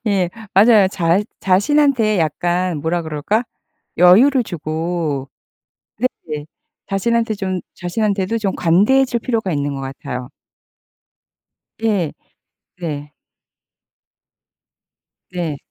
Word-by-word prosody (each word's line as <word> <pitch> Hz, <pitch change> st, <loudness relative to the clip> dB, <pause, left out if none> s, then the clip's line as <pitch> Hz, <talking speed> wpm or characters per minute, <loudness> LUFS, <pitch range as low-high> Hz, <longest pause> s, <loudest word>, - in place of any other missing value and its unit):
예. 190 Hz, -4 st, +1 dB, 0.2 s
맞아요. 205 Hz, -1 st, +6 dB
자 175 Hz, 0 st, +1 dB, 0.2 s
자신한테 220 Hz, +2 st, +3 dB
약간 175 Hz, +2 st, 0 dB
뭐라 165 Hz, +3 st, -1 dB
그럴까? 160 Hz, -, -1 dB, 0.5 s
여유를 240 Hz, +10 st, +6 dB
주고 160 Hz, -5 st, -3 dB, 1.0 s
네네. 150 Hz, -1 st, -5 dB, 0.4 s
자신한테 225 Hz, +3 st, 0 dB
좀 190 Hz, -2 st, -3 dB
자신한테도 200 Hz, +3 st, -1 dB
좀 200 Hz, -3 st, -1 dB
관대해질 235 Hz, +9 st, +3 dB
필요가 225 Hz, -6 st, -1 dB
있는 145 Hz, -1 st, -1 dB
것 135 Hz, -, -5 dB
같아요. 130 Hz, -2 st, -6 dB, 1.5 s
예. 200 Hz, -8 st, 0 dB, 0.7 s
네. 150 Hz, -3 st, -5 dB, 2.2 s
네. 165 Hz, -5 st, -3 dB
185 Hz, 190 characters per minute, -19 LUFS, 160-215 Hz, 2.2 s, 맞아요